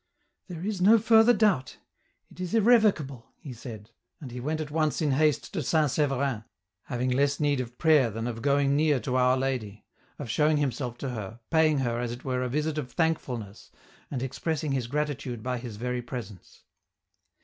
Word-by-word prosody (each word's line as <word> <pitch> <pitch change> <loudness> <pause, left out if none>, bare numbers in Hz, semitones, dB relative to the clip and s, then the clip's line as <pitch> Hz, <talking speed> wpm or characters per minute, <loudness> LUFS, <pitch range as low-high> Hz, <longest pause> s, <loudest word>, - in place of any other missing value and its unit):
" - - -50
There 175 -1 -6
is 205 -3 -2
no 215 +5 +7
further 225 +1 +5
doubt; 200 - +1 0.5
it - - -17
is 185 +4 -2
irrevocable," 205 - +3
he 140 -6 -9
said, 115 -2 -10 0.3
and 135 -5 -9
he 125 - -6
went 155 +5 -2
at 150 -2 -5
once 155 -3 0
in 150 -3 +1
haste 150 0 +1
to 175 - -1
St. 150 0 +2
Sever 140 -2 +1
in, 125 -6 -2 0.4
having 125 +1 -2
less 140 +2 +1
need 145 -3 +1
of 125 -1 -6
prayer 155 -7 +4
than 115 +1 -5
of 115 -2 -4
going 140 0 +2
near 150 -2 +3
to 125 +3 -3
Our 130 0 +3
Lady; 125 -6 -3 0.3
of 145 - -6
showing 150 +6 +2
himself 130 -4 -2
to 135 - -4
her, 115 -2 -6
paying 160 -2 +4
her, 120 -2 -1
as 120 -1 -2
it 120 +3 -8
were, 130 -1 -1
a 125 - -1
visit 150 +3 -1
of 125 -4 -6
thankfulness, 125 - -2 0.4
and 130 -3 -3
expressing 155 +3 -2
his 130 -3 -1
gratitude 135 -4 -3
by 125 -1 -2
his 120 -3 -7
very 125 +2 -2
presence. 120 -6 -9
135 Hz, 195 wpm, -27 LUFS, 120-155 Hz, 0.5 s, no